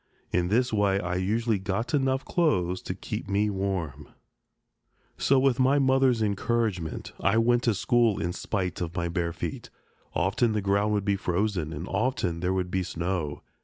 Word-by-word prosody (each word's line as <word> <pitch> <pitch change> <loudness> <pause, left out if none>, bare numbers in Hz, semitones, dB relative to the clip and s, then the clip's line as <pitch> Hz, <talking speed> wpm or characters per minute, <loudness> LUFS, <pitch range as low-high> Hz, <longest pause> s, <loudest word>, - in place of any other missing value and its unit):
In 90 0 +1
this 120 +5 +1
way 100 -2 +2
I 90 -1 -3
usually 110 +3 0
got 100 +8 -2
enough 135 -1 +1
clothes 95 - +1
to - - -5
keep - - -6
me 105 +1 +1
warm. 90 -7 -3 1.1
So, 135 - +3
with 130 -1 +3
my 130 +2 +4
mother's 130 -4 +3
encouragement, 100 -5 -1
I 100 +3 +2
went 120 +1 +3
to 115 -4 +2
school 115 +1 +2
in 90 +1 -2
spite 95 -3 -3
of 85 -1 -4
my 85 -1 -1
bare 85 0 -1
feet. - - -5 0.5
Often 110 +5 +1
the 105 - 0
ground 100 +2 +2
would 100 -2 0
be 100 -1 +1
frozen, 90 -3 -1
and 85 +4 -5
often 95 -6 -1
there 90 +2 0
would 90 -1 -1
be 95 - 0
snow. 85 -4 -3
100 Hz, 170 wpm, -27 LUFS, 90-115 Hz, 1.1 s, my